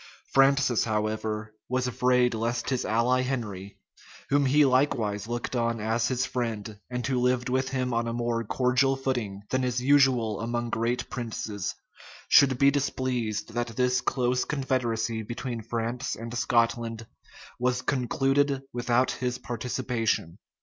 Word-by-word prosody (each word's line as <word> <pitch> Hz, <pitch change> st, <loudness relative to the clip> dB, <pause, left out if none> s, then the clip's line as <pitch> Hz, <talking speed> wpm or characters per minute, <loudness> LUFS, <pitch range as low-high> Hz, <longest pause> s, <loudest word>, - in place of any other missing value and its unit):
Francis, 135 Hz, -3 st, +4 dB
however, 110 Hz, 0 st, -2 dB, 0.2 s
was 125 Hz, 0 st, 0 dB
afraid 125 Hz, 0 st, +2 dB
lest 115 Hz, +3 st, -2 dB
his 130 Hz, -, 0 dB
ally 120 Hz, +4 st, +2 dB
Henry, 105 Hz, -7 st, -4 dB, 0.5 s
whom 140 Hz, 0 st, +3 dB
he 145 Hz, +3 st, +5 dB
likewise 120 Hz, -6 st, +1 dB
looked 120 Hz, +2 st, -3 dB
on 115 Hz, -1 st, 0 dB
as 115 Hz, +2 st, 0 dB
his 130 Hz, +1 st, 0 dB
friend, 110 Hz, -4 st, -4 dB
and 125 Hz, -1 st, -3 dB
who 130 Hz, -2 st, 0 dB
lived 125 Hz, 0 st, +1 dB
with 130 Hz, +1 st, 0 dB
him 130 Hz, -2 st, -1 dB
on 115 Hz, 0 st, 0 dB
a -, -, -1 dB
more 120 Hz, -1 st, -1 dB
cordial 130 Hz, +4 st, +2 dB
footing 120 Hz, -7 st, -3 dB
than 130 Hz, 0 st, +1 dB
is 125 Hz, -1 st, 0 dB
usual 125 Hz, -6 st, +3 dB
among 120 Hz, 0 st, -2 dB
great 120 Hz, +2 st, -1 dB
princes, 110 Hz, -5 st, -4 dB, 0.5 s
should 135 Hz, -3 st, +6 dB
be 140 Hz, +2 st, +5 dB
displeased 125 Hz, -6 st, -1 dB
that 120 Hz, 0 st, -1 dB
this 125 Hz, 0 st, +2 dB
close 125 Hz, -1 st, +1 dB
confederacy 120 Hz, -5 st, -1 dB
between 120 Hz, +2 st, -5 dB
France 115 Hz, +3 st, -3 dB
and 115 Hz, +1 st, -7 dB
Scotland 115 Hz, -1 st, 0 dB, 0.5 s
was 125 Hz, +1 st, 0 dB
concluded 135 Hz, +1 st, +1 dB
without 120 Hz, +1 st, +1 dB
his 125 Hz, -1 st, -2 dB
participation. 120 Hz, -7 st, -2 dB
120 Hz, 140 wpm, -27 LUFS, 115-130 Hz, 0.5 s, should